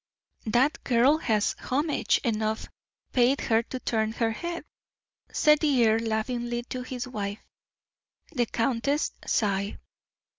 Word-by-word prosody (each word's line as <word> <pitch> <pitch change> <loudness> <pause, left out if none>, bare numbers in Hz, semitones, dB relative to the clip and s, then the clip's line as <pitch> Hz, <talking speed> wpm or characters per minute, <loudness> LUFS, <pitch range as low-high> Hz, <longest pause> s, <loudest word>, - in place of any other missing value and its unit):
"That 255 +7 +2
girl 260 +5 +4
has 215 -7 +1
homage 290 +4 +1
enough 220 -2 -1 0.5
paid 255 +2 +4
her 225 0 +2
to 255 +2 -6
turn 220 -3 0
her 225 -1 0
head," 345 +8 -5 0.7
said 300 -1 +4
the 270 -7 +3
earl, 220 +1 +3
laughingly, 240 +2 -2
to 255 - -4
his 250 0 -5
wife. 205 -4 -5 0.9
The 245 -7 0
countess 265 +6 0 0.2
sighed. 200 -1 0
240 Hz, 120 wpm, -27 LUFS, 220-265 Hz, 0.9 s, girl